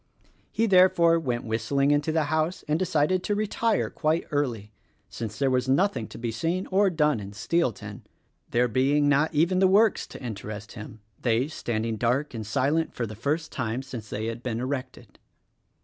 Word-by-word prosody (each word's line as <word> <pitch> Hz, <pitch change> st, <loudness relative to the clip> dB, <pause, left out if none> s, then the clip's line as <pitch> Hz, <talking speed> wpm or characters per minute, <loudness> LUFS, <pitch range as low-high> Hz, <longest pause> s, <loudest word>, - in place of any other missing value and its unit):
He, 225 Hz, -, +1 dB
therefore, 180 Hz, -4 st, +5 dB
went 125 Hz, -6 st, -2 dB
whistling 120 Hz, +6 st, 0 dB
into 145 Hz, +2 st, +1 dB
the 160 Hz, 0 st, +1 dB
house 155 Hz, +4 st, -1 dB
and 150 Hz, +2 st, +1 dB
decided 180 Hz, 0 st, +1 dB
to 205 Hz, -, -1 dB
retire 215 Hz, +1 st, 0 dB
quite 160 Hz, +1 st, 0 dB
early, 120 Hz, -8 st, -2 dB, 0.4 s
since 110 Hz, -2 st, -6 dB
there 135 Hz, 0 st, +1 dB
was 130 Hz, 0 st, 0 dB
nothing 135 Hz, -, +1 dB
to -, -, -11 dB
be 115 Hz, 0 st, -3 dB
seen 165 Hz, -, -2 dB
or 195 Hz, +1 st, +4 dB
done 150 Hz, -7 st, +1 dB
in 100 Hz, 0 st, -8 dB
Steelton 120 Hz, +4 st, -2 dB, 0.2 s
— -, -, -45 dB
there 125 Hz, +1 st, +2 dB
being 140 Hz, +5 st, +2 dB
not 145 Hz, +2 st, +3 dB
even 170 Hz, +5 st, +2 dB
the 190 Hz, -, +5 dB
works 205 Hz, +3 st, +3 dB
to -, -, -10 dB
interest 105 Hz, -2 st, -6 dB
him, 110 Hz, -1 st, -10 dB
— 95 Hz, -, -36 dB
they 120 Hz, +2 st, +1 dB
standing 115 Hz, -6 st, -3 dB
dark 125 Hz, +6 st, 0 dB
and 110 Hz, -3 st, -6 dB
silent 140 Hz, +8 st, 0 dB
for 120 Hz, -, -2 dB
the 110 Hz, -, -7 dB
first 150 Hz, +9 st, -2 dB
time 120 Hz, +2 st, -3 dB
since 120 Hz, -5 st, -8 dB
they 110 Hz, -, -3 dB
had 115 Hz, +1 st, -4 dB
been 120 Hz, -2 st, -3 dB
erected. 130 Hz, +1 st, -5 dB
140 Hz, 185 wpm, -26 LUFS, 115-165 Hz, 0.4 s, therefore